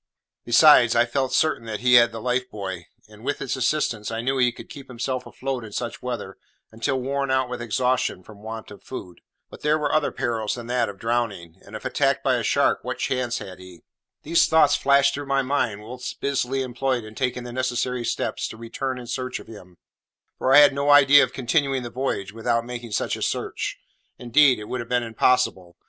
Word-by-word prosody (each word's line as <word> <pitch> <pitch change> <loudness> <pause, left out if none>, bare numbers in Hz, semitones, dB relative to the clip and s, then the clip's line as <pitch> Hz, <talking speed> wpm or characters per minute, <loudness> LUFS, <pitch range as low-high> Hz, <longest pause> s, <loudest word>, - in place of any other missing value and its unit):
Besides, 120 -1 +6
I 120 0 +4
felt 130 +2 -1
pretty - - -2
certain 115 -9 0
he 125 +2 +2
had 120 -1 +7
the 115 - -7
life 125 +2 -1
buoy; 95 -4 -6 0.2
and, 105 +1 -16
with 145 - -2
its 140 - -3
assistance, 125 -5 -1
I 115 0 -3
knew 135 +2 -1
he 125 -1 +3
could - - -12
keep 140 -1 -11
himself 125 +1 -4
afloat 130 -2 -4
in 105 -2 -10
such 120 -1 -4
weather 120 -6 -5 0.3
until 130 +4 -2
worn 140 +1 -2
out 130 -1 +1
with 125 - -5
exhaustion 125 -3 0
from 105 +1 -15
want 110 0 -8
of 100 - -12
food. 90 -9 -9 0.3
But - - -12
there 150 +1 +2
were 150 -2 -1
other 155 -1 +2
perils 115 -3 -2
than 120 -1 -8
that 120 -2 0
of 100 - -9
drowning; 115 -7 -3
and, - - -12
if - - -8
attacked - - +1
by - - +2
a - - -3
shark, - - +2
what - - -5
chance 125 -2 -1
had 95 -2 -9
he? 90 -2 -14 0.4
These 165 +3 +3
thoughts 160 -3 +4
flashed 140 0 +3
through 145 0 -5
my 135 0 +1
mind 130 -6 -1
whilst 125 +3 -7
busily 135 -1 -1
employed 125 -1 -2
in 110 0 -11
taking 125 +1 -2
the 120 -1 -8
necessary 125 -1 -1
steps - - -2
to 110 - -9
return 125 +3 -4
in 125 - -8
search 125 +1 -4
of - - -12
him, 90 -5 -13 0.6
for 130 - +1
I 135 - +8
had 145 -1 +8
no 140 +1 -1
idea 145 0 +7
of - - -2
continuing 135 0 0
the 120 - -7
voyage 115 -7 -3
without 115 +1 -1
making 120 -2 -7
such - - -1
a - - -9
search; - - -3 0.4
indeed, 130 +2 +4
it 105 - -7
would 125 +4 -4
have 120 - -7
been 125 -1 +1
impossible. 115 -6 +1
125 Hz, 215 wpm, -24 LUFS, 115-135 Hz, 0.6 s, I